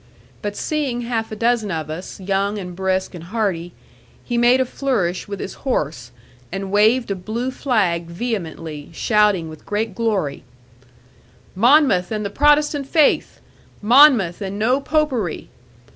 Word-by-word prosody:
But 205 -1 -4
seeing 280 -6 -2
half 230 -2 -3
a - - -4
dozen 230 -1 +1
of 160 -3 -3
us, 175 +5 -7
young, 195 +2 -1
and 180 -3 -7
brisk, 190 +1 -1
and 170 -2 -9
hearty, 185 -4 -2 0.5
he 240 - -3
made 240 +2 +4
a 260 - +2
flourish 230 -10 -2
with 200 -1 -6
his - - -5
horse, 150 - -2 0.4
and 195 0 -4
waved 220 +3 +3
a - - 0
blue 225 +7 -4
flag 195 -11 0
vehemently, 170 -6 -5
shouting 210 -3 +2
with 155 -1 -11
great 210 0 -2
glory, 190 -10 -1 1.1
'Monmouth 235 - +4
and 215 -1 -3
the 200 - -3
Protestant 295 +1 +2
faith! 305 0 +2 0.4
Monmouth 225 - +5
and 195 0 -4
no 250 +6 +1
Popery! 275 - -1
210 Hz, 145 wpm, -20 LUFS, 180-245 Hz, 1.1 s, Monmouth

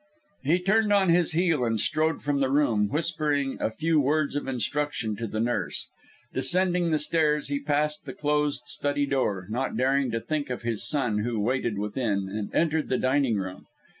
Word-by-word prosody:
He 155 +6 +2
turned 205 +4 +2
on 195 -3 +4
his 170 -1 +3
heel, 165 -5 +2
and 115 -2 0
strode 155 +7 0
from 145 -1 0
the 135 -1 +1
room, 115 -8 +2
whispering 150 -2 -1
a - - +1
few 155 +7 +1
words 145 +1 +1
of 145 - -2
instruction 130 -2 -2
to 115 - -3
the 110 +1 -4
nurse. 120 +2 -1 0.4
Descending 175 +6 +2
the 155 - +2
stairs, 150 -1 +1
he 140 0 -1
passed 150 +1 -1
the 130 - -5
closed 150 -3 0
study 145 +2 0
door, 110 -9 -1
not 125 0 -2
daring 135 +1 +2
to 115 0 -1
think 150 +3 -3
of 125 -1 -4
his 115 -3 -1
son 125 -8 +1
who 115 +1 -2
waited 120 -1 0
within, 105 -1 -1
and 105 -1 -4
entered 160 -2 +1
the 130 - +1
dining 130 -2 +2
room. 95 -1 -6
140 Hz, 185 wpm, -26 LUFS, 120-155 Hz, 0.4 s, on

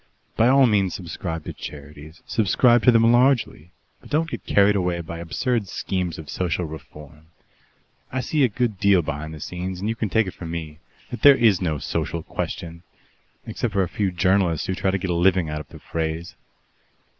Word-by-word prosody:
"By 115 - +4
all 135 +1 +6
means 100 -6 +2
subscribe 80 -2 -5
to - - -6
charities 75 +2 -10
subscribe 120 +3 +3
to 125 - +8
them 115 0 +5
largely 120 - +2 0.3
but - - -16
don't 160 +2 0
get - - -7
carried 100 0 +4
away 90 -3 0
by 85 0 -7
absurd 110 +6 -1
schemes 90 -2 -3
of 80 - -9
Social 90 +1 -2
Reform. 75 0 -11 0.8
I 130 - -1
see 145 +3 +1
a - - +6
good 110 -2 -2
deal 100 -3 +4
behind 75 +1 -5
the 80 - -9
scenes, 90 +4 -5
and 100 - -3
you 115 - -1
can 110 -2 -2
take 110 +1 +2
it 95 - -6
from 85 - -8
me 80 -2 -6 0.3
that 120 - -6
there 140 -1 +8
is 110 -8 +3
no 80 -4 -1
Social 80 +3 -3
Question 85 0 -5 0.6
except 115 -3 -3
for 100 -2 +2
a - - -2
few 100 +1 -1
journalists 90 -2 +1
who 95 - -2
try 95 +1 -1
to 95 - +1
get 95 -1 -3
a - - +1
living 85 -2 +2
out 75 0 -3
of - - -13
the - - -12
phrase. 80 +1 -4
90 Hz, 200 wpm, -23 LUFS, 80-110 Hz, 0.8 s, to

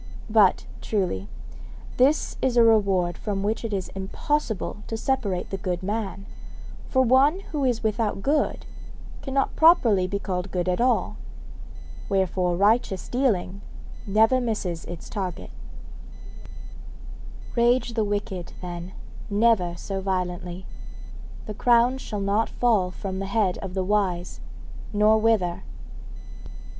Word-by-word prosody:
But, 210 -4 +4 0.2
truly, 180 - -1 0.7
this 275 +5 +3
is 255 -2 +1
a 235 - +7
reward 195 -6 +3
from 200 -2 -3
which 215 +3 -1
it 230 - -3
is 195 -2 -2
impossible 215 +4 -2
to 225 - -3
separate 215 -7 -1
the 195 - -2
good 180 -1 -3
man, 200 -1 -3 0.6
for 260 -1 +3
one 270 +9 +4
who 295 -3 -1
is 245 -3 0
without 215 -2 -1
good 295 +1 0 0.6
cannot 270 0 -1
properly 230 - +5
be 200 +2 -2
called 185 -1 -3
good 180 -1 -2
at 180 +4 0
all; 250 +1 +1 0.9
wherefore 185 -2 +1
righteous 205 -1 +2
dealing 205 -7 0 0.5
never 220 +5 +4
misses 200 -8 -3
its 175 +4 -9
reward. 185 -4 -4 2.0
Rage 240 0 +2
the 225 -2 +1
wicked, 205 -3 -3
then, 175 0 -7 0.4
never 205 -5 +2
so 195 +2 -4
violently, 180 -1 -3 0.8
the 215 - -5
crown 240 +4 +3
shall 210 -5 -5
not 200 +3 +1
fall 215 -7 +2
from 190 +1 -5
the 195 - -3
head 200 -3 0
of 190 -1 -7
the 190 - 0
wise, 185 -3 -1 0.5
nor 215 +1 +4
wither. 215 -6 +1
205 Hz, 125 wpm, -25 LUFS, 185-235 Hz, 2.0 s, a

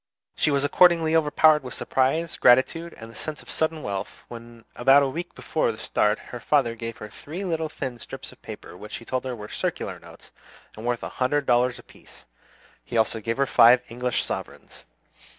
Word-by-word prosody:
She - - +1
was 140 -1 +1
accordingly 165 +1 +4
overpowered 155 0 +4
with 125 - -7
surprise, 145 +6 0
gratitude, 150 +7 +3
and 115 0 -10
the - - -17
sense 155 -1 -6
of - - -10
sudden 160 -1 -1
wealth, 100 -1 -5
when 115 -1 -11
about 135 +3 +5
a - - +1
week 170 +6 -6
before 155 - -1
the 110 - -10
start 105 -1 +1
her 120 - -9
father 130 -3 +2
gave 115 0 -6
her 105 - -8
three 160 - -7
little 160 -3 -2
thin 130 -5 -5
strips - - -9
of - - -19
paper, - - -10
which 105 +4 -8
he 115 - -9
told 130 +1 -2
her 130 -1 -3
were 105 -2 -8
circular - - -4
notes, - - -15 0.4
and 110 +2 -7
worth 120 -1 -1
a - - -4
hundred 145 +3 +1
dollars 125 0 +2
apiece. - - -16 0.6
He 120 - -4
also 110 0 +1
gave 115 +3 -2
her 140 - +3
five 125 -1 +6
English 125 +1 -2
sovereigns. - - -7
130 Hz, 195 wpm, -25 LUFS, 115-155 Hz, 0.6 s, five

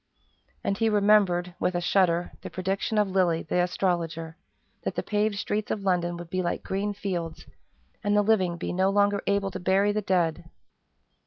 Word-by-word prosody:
And 200 +1 -1
he 225 -1 +3
remembered, 200 -4 +3
with 180 - 0
a - - +1
shudder, 175 -1 +2
the - - -7
prediction 195 +3 -2
of 210 -1 +3
Lilly, 175 -3 +2
the 180 +3 0
astrologer, 170 -3 -1 0.5
that - - -3
the - - -2
paved 210 0 0
streets 210 +1 -2
of 205 - -2
London 175 -2 0
would 170 -1 -9
be 185 - 0
like 175 -1 -2
green 200 +2 -2
fields, 175 -5 -4 0.6
and 205 0 +2
the 205 - +4
living 190 -5 +2
be 175 - -4
no 190 +2 +2
longer 205 0 +2
able 200 -1 +1
to - - -5
bury 195 +3 +2
the 215 +1 -1
dead. 175 -5 0
190 Hz, 180 wpm, -27 LUFS, 175-205 Hz, 0.6 s, the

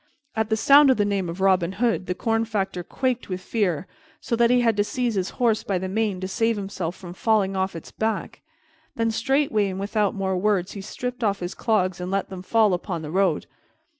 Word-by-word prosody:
At 220 -1 0
the 220 - +1
sound 280 +5 +7
of 260 - +4
the 205 - +2
name 195 -3 -1
of 175 +3 -6
Robin 190 -2 +3
Hood, 225 -2 0
the 180 - -1
corn 225 +2 0
factor 200 -5 -2
quaked 255 +6 -2
with 185 -1 -3
fear, 185 -5 -1 0.3
so 235 - -2
that 235 0 +4
he 250 0 +4
had 230 -2 +3
to 205 - +4
seize 245 +2 -1
his 190 -2 -1
horse 230 -3 +2
by 195 - -1
the 190 +1 -3
mane 205 -1 -1
to 185 - -2
save 225 +3 +1
himself 190 -3 -4
from 175 -2 -9
falling 200 -1 +1
off 190 -1 -1
its 165 - -9
back. 220 -2 -3 0.5
Then 230 -1 +1
straightway, 225 -3 +1
and 190 0 -5
without 205 +1 0
more 190 -1 -1
words, 195 -2 +1
he 200 - -7
stripped 250 +4 -5
off 200 -2 +1
his 175 +1 -4
clogs 185 -6 0
and 180 - -4
let 195 0 -1
them 185 -1 -6
fall 215 +1 +3
upon 175 -2 -3
the 150 - -6
road. 195 +2 +1
200 Hz, 225 wpm, -24 LUFS, 185-225 Hz, 0.5 s, sound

